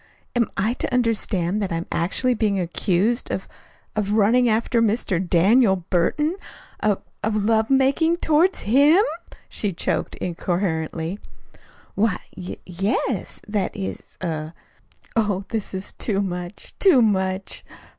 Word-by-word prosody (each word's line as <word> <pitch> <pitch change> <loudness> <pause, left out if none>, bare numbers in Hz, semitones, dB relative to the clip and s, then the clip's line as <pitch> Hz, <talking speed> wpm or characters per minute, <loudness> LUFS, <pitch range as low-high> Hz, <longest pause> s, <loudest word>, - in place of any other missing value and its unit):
"Am 235 -3 +2
I 215 +4 +1
to - - -4
understand 215 -6 0
that 195 - -2
I - - 0
am 165 +1 -3
actually 225 +9 +1
being 210 -4 +1
accused 185 +6 +1
of - - -3 0.5
of 210 -1 0
running 230 +4 +4
after 230 +2 +2
Mr. 215 -5 +1
Daniel 190 +5 +4 0.2
Burton? 295 - +1 0.4
of 210 -2 0 0.2
of 215 -1 0
love 220 +1 +2
making 275 +5 +3
toward 330 +4 +3
HIM?" 290 - +4 0.4
she 205 -3 -1
choked - - -2
incoherently. 170 0 -2 0.7
"Why, 205 -2 +1 0.2
y 180 -1 -7
yes; 195 +5 -2
that 205 -1 -1
is 195 - -6
er 160 -1 -3 0.3
" - - -29
"Oh, 205 -4 +1
this 220 -3 -3
is 190 0 -5
too 200 -3 0
much, 180 0 -6
too 325 - +6
much! 190 -2 0
205 Hz, 135 wpm, -23 LUFS, 185-235 Hz, 0.7 s, too